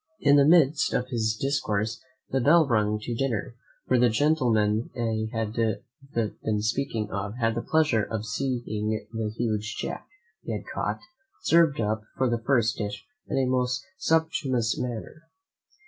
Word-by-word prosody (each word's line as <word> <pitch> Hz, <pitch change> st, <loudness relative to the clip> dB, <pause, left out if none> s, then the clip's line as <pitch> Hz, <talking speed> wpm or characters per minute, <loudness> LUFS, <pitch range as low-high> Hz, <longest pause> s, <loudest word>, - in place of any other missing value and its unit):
In 145 Hz, 0 st, +5 dB
the 140 Hz, -1 st, +6 dB
midst 155 Hz, -3 st, +4 dB
of 125 Hz, +1 st, -1 dB
his 110 Hz, -3 st, 0 dB
discourse 115 Hz, -6 st, -1 dB, 0.3 s
the 135 Hz, -, +1 dB
bell 155 Hz, +4 st, +5 dB
rung 105 Hz, -3 st, +2 dB
to 120 Hz, -, -3 dB
dinner, 120 Hz, -2 st, -2 dB, 0.3 s
where 130 Hz, -, +2 dB
the 120 Hz, 0 st, +5 dB
gentleman 115 Hz, -5 st, +2 dB
I 110 Hz, -2 st, -1 dB
have 110 Hz, -1 st, -2 dB
been 115 Hz, -2 st, -2 dB
speaking 110 Hz, -2 st, -1 dB
of 100 Hz, +2 st, -3 dB
had 115 Hz, -2 st, +1 dB
the 115 Hz, -, -2 dB
pleasure 155 Hz, -8 st, +2 dB
of 110 Hz, -1 st, -4 dB
seeing 110 Hz, -1 st, -2 dB
the 110 Hz, -1 st, -2 dB
huge 110 Hz, -2 st, -1 dB
jack, -, -, -5 dB, 0.3 s
he 115 Hz, -, -4 dB
had 105 Hz, -, -5 dB
caught, 105 Hz, +1 st, -2 dB, 0.4 s
served 165 Hz, -4 st, +4 dB
up 110 Hz, 0 st, 0 dB, 0.2 s
for 130 Hz, -, +2 dB
the 120 Hz, -1 st, -1 dB
first 115 Hz, -3 st, +2 dB
dish 105 Hz, -1 st, -4 dB, 0.2 s
in -, -, -2 dB
a 135 Hz, -, +3 dB
most 125 Hz, 0 st, 0 dB
sumptuous 135 Hz, -8 st, +1 dB
manner. 125 Hz, +7 st, -6 dB
115 Hz, 155 wpm, -26 LUFS, 110-135 Hz, 0.4 s, the